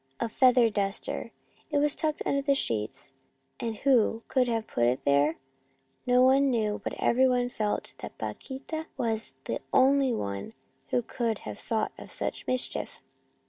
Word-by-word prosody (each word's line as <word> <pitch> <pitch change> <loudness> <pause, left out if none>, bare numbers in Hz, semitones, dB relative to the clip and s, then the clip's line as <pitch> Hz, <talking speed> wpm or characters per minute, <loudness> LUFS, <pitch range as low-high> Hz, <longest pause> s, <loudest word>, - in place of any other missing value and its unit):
A - - 0
feather 250 0 +5
duster! 200 -1 -2 0.4
It 295 - 0
was 295 0 +3
tucked 310 -1 -1
under 280 - +1
the 280 0 +2
sheets, 130 - -2 0.5
and 225 -1 -2
who 230 -2 +2
could 255 -2 +2
have 225 -2 -1
put 120 - 0
it 125 +2 0
there? 145 +3 +3 0.7
No 250 0 +5
one 270 +2 +5
knew, 215 -4 0
but - - -3
every 260 +2 +3
one 245 -1 +1
felt 215 -3 -2
that - - -8
Paquita 315 +4 -5
was 225 -2 -2
the - - -2
only 270 0 +4
one 100 - -3 0.3
who 245 - 0
could 230 -2 -2
have 105 -1 -6
thought 220 -1 -1
of - - -11
such - - -4
mischief. 255 0 -2
240 Hz, 160 wpm, -28 LUFS, 210-265 Hz, 0.7 s, feather